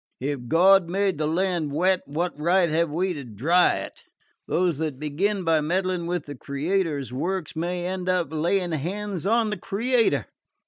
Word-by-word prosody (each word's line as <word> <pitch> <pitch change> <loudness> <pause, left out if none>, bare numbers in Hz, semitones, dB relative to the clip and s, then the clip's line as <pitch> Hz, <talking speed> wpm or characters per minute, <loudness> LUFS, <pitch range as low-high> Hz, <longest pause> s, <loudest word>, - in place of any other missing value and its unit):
If 135 -2 -3
God 180 +4 +5
made 190 -3 0
the 155 - +1
land 170 -2 0
wet, 180 +5 +2
what 170 +5 -2
right 175 +4 +3
have 165 +1 +1
we 180 +5 -1
to 145 -4 -6
dry 135 - +2
it? - - -7 0.4
Those 175 -4 +1
that 155 -4 -2
begin 185 +8 -1
by 165 -2 +3
meddling 180 +2 -1
with 175 -3 -2
the 145 - -7
Creator's 145 - -2
works 175 +6 -3
may 175 +2 -2
end 185 0 -3
by 185 -1 +3
laying 170 +4 -1
hands 185 +4 -3
on 225 0 +2
the 210 - -2
Creator." 230 +6 +1
175 Hz, 170 wpm, -25 LUFS, 150-190 Hz, 0.4 s, God